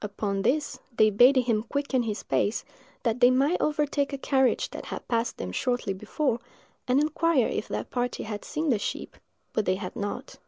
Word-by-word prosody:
Upon 200 -1 -2
this, 290 +8 0 0.2
they 215 0 +5
bade 245 +7 +6
him 235 -4 +2
quicken 270 +2 -1
his 215 -3 -3
pace, 210 - 0 0.4
that 230 0 0
they 245 - +7
might 275 +7 +2
overtake 295 -1 0
a 275 - -3
carriage 265 -1 +1
that - - -7
had - - -6
passed 230 0 0
them 90 - -4
shortly 245 - -1
before, 225 +6 -1 0.5
and 255 +2 +4
inquire 310 -3 +2
if - - -3
that - - -4
party 245 0 -2
had 210 -1 -5
seen 310 +1 -2
the 230 -6 +3
sheep; - - -4 0.4
but 215 - 0
they 185 - +3
had 185 -2 -6
not. 205 0 -5
245 Hz, 190 wpm, -27 LUFS, 215-280 Hz, 0.5 s, they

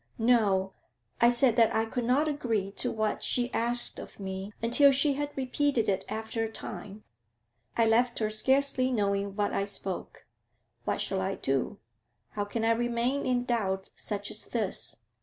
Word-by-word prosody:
'No. 210 -5 +2 0.5
I 235 - +7
said 245 -1 +2
that 230 -2 +4
I 220 0 +2
could 240 +1 -3
not 270 +6 +2
agree 230 -9 -1
to - - 0
what 215 -1 -1
she 245 0 +1
asked 240 +1 +3
of - - -11
me 190 +1 -5
until 245 +5 +6
she 280 +2 +3
had 290 +1 -2
repeated 265 -2 0
it 195 -1 0
after 220 +1 -3
a 225 - -3
time. 205 -1 -8 0.7
I 230 - +4
left 240 +2 +2
her 215 -1 0
scarcely 260 +3 +2
knowing 200 -3 0
what 205 -1 0
I 195 - 0
spoke. 195 -2 -5 0.6
What - - -1
shall 190 -1 -1
I 190 +1 -1
do? 135 -1 -1 0.5
How 205 -1 -3
can 225 +2 -2
I 225 - +4
remain 240 +3 0
in 245 -1 +1
doubt 190 -6 -1
such 205 -1 -4
as 215 - -7
this? 205 - -3
225 Hz, 170 wpm, -29 LUFS, 200-245 Hz, 0.7 s, I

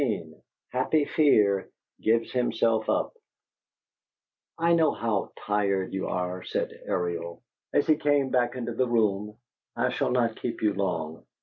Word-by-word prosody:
XV 100 - -1 0.4
HAPPY 145 +4 +2
FEAR 105 -12 +3 0.3
GIVES 115 +1 +2
HIMSELF 115 -3 +1
UP - - +1 1.4
"I 170 +1 +3
know 160 -3 +4
how 110 -4 -1
tired 100 -2 0
you 95 - -2
are," 90 0 -2
said - - -2 0.2
Ariel, 85 +1 -3 0.3
as 145 - +2
he 155 - +4
came 145 -2 +2
back 120 -1 +1
into 120 -2 -3
the 125 +2 +1
room. 105 -2 0 0.4
"I - - +1
shall - - 0
not 120 -3 +1
keep 120 - -4
you 105 -2 +3
long." 85 -5 -2
110 Hz, 140 wpm, -27 LUFS, 95-125 Hz, 1.4 s, know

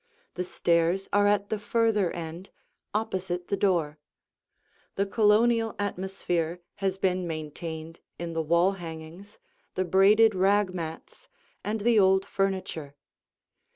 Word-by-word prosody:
The 180 - -3
stairs 170 +1 +1
are 205 0 +4
at 205 0 +1
the 215 - -1
further 215 -3 +1
end, 170 +2 -7 0.4
opposite 185 -4 -3
the 200 - +1
door. 170 -7 0 1.0
The 200 - +1
Colonial 225 +2 +3
atmosphere 180 -4 -2 0.2
has 195 -2 -1
been 185 -2 0
maintained 160 +1 -6 0.2
in 170 -1 -5
the 165 - 0
wall 170 +4 +3
hangings, 170 +2 -9 0.4
the 185 - 0
braided 205 +5 +5
rag 195 +1 +2
mats, 165 -2 -7 0.4
and 215 +1 -2
the 230 0 +4
old 190 0 +4
furniture. 190 -8 -2
190 Hz, 120 wpm, -27 LUFS, 170-205 Hz, 1.0 s, braided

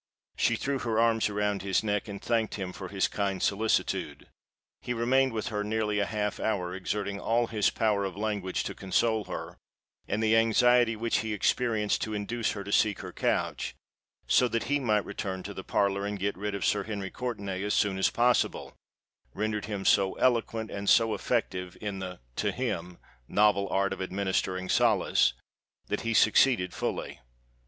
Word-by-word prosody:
She - - +2
threw 140 -1 -2
her 115 -2 0
arms 115 -1 +3
around 105 -1 -1
his 95 +1 +1
neck, 105 0 -1
and 100 -1 -6
thanked 115 -2 0
him 95 -3 -5
for 95 - -7
his 95 -1 0
kind 100 -2 -2
solicitude. 110 +2 0 0.6
He 120 - -3
remained 130 +3 +2
with 110 -1 -3
her 105 -1 -2
nearly 105 0 0
half 105 0 -1
an - - -3
hour, 90 -5 -1
exerting 100 +1 -3
all 120 +1 +1
his 110 -3 +1
power 105 -3 +1
of 95 -1 -4
language 100 -3 -2
to - - -4
console 110 +3 0
her; - - -7 0.5
and 110 +2 -1
the 110 0 +4
anxiety 115 +1 +4
which 115 +1 0
he 110 0 -2
experienced 110 0 +1
to 110 -1 -2
induce 115 +3 -2
her 100 - -5
to 100 - -7
seek 105 -1 +2
her - - -8
couch, - - -1 0.5
so 125 - +4
that 115 -1 -1
he 145 +1 0
might 105 -6 +1
return 95 -1 -4
to 100 - -6
the 95 - -7
parlour 100 0 +1
and 105 0 -3
get 100 +1 -1
rid 105 +1 -3
of 100 - -2
Sir - - +2
Henry 100 -3 -4
Courtenay 100 -7 -4
as 105 +1 0
soon 95 -2 +1
as 95 - +3
possible, 120 +1 +1 0.6
rendered 105 -1 -2
him 100 -2 -4
so 95 -2 +4
eloquent 115 -3 0
and 100 0 -2
so 115 -2 +5
effective 90 -2 -2
in 100 -2 -4
the 90 -1 -6 0.2
(to - - +1
him) 85 +1 -3 0.3
novel 100 -2 +3
art 100 +1 +1
of - - -7
administering 95 -1 -1
solace, - - +3 0.6
that - - -1
he 115 0 -1
succeeded 105 -4 +4
fully. - - -4
105 Hz, 180 wpm, -28 LUFS, 100-115 Hz, 0.6 s, so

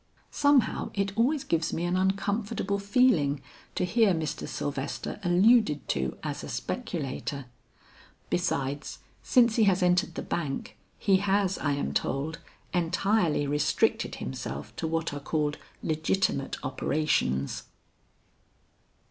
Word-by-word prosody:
Somehow 285 -4 +3
it 195 0 -1
always 265 +6 +2
gives 165 -1 0
me 165 - -2
an 175 +1 0
uncomfortable 200 +2 0
feeling 200 - +3 0.4
to - - +1
hear 215 -1 +3
Mr. 160 -2 -3
Sylvester 140 +5 -4
alluded 180 - +4
to 65 -2 -1
as - - -4
a - - -6
speculator. 140 - -4 0.9
Besides 145 -5 -1 0.2
since 240 -3 +4
he 220 - +5
has 185 -2 +3
entered 180 -1 +2
the - - -4
Bank, 175 - -3 0.2
he 195 -2 +3
has 195 0 +1
I 145 -1 0
am 140 - -2
told, 150 +4 -1 0.3
entirely 175 -2 +2
restricted 145 +1 +1
himself 65 +2 -6
to 165 - -2
what 165 -1 -1
are 145 - -4
called 150 0 -1 0.2
legitimate 155 -2 0
operations." 130 - 0
175 Hz, 120 wpm, -28 LUFS, 145-200 Hz, 0.9 s, he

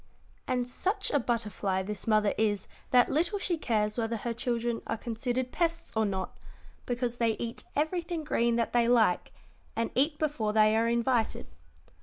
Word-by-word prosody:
"And 250 -1 0
such 390 - -1
a 290 - +3
butterfly 210 -6 -1
this 210 +3 -5
mother 215 -2 +3
is 205 -3 0 0.2
that 250 -1 +5
little 340 +7 +1
she 380 -3 0
cares 215 -7 0
whether 230 0 -1
her 235 +2 -3
children 235 0 -1
are 225 - -1
considered 245 +3 -2
pests 335 -1 -1
or 220 -1 +2
not, 190 -1 -4 0.5
because 245 -1 -1
they 230 -2 +2
eat 230 +1 -5
everything 335 +2 -1
green 235 -5 +1
that 230 -1 0
they 240 -1 +4
like, 225 -7 +3 0.4
and 230 - -1
eat 295 +4 +2
before 280 -9 -1
they 215 0 +5
are 225 +1 +3
invited. 235 0 +1
235 Hz, 165 wpm, -29 LUFS, 220-260 Hz, 0.5 s, that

